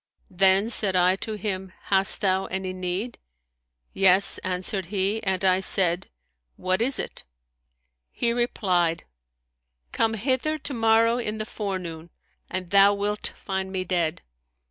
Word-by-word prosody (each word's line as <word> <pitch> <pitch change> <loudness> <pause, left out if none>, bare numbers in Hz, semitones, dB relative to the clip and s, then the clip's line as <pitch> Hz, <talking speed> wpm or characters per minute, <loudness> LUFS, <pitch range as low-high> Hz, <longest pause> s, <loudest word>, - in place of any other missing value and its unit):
Then 190 +4 +3
said 200 -5 0
I 180 +1 +4
to 220 - -4
him, 190 -2 -4
Hast 195 -1 +2
thou 190 -1 +1
any 190 0 -4
need?' 185 +6 -4 0.7
Yes,' 195 0 +4
answered 185 0 -3
he; 200 +3 0
and 190 -1 -1
I 185 0 +4
said, 185 -2 +3 0.5
What 185 +2 -1
is 260 +3 +1
it?' - - -5 0.9
He 235 -1 0
replied, 180 -8 0 0.9
Come 225 0 0
hither 260 +7 0
to 285 -1 -5
morrow 230 0 +3
in 215 -2 -3
the 215 - -4
forenoon 180 -6 -5 0.4
and 185 -2 -5
thou 200 0 +6
wilt 205 +1 -2
find 190 -1 -3
me 190 -1 -2
dead. 175 -3 -1
190 Hz, 135 wpm, -25 LUFS, 185-215 Hz, 0.9 s, thou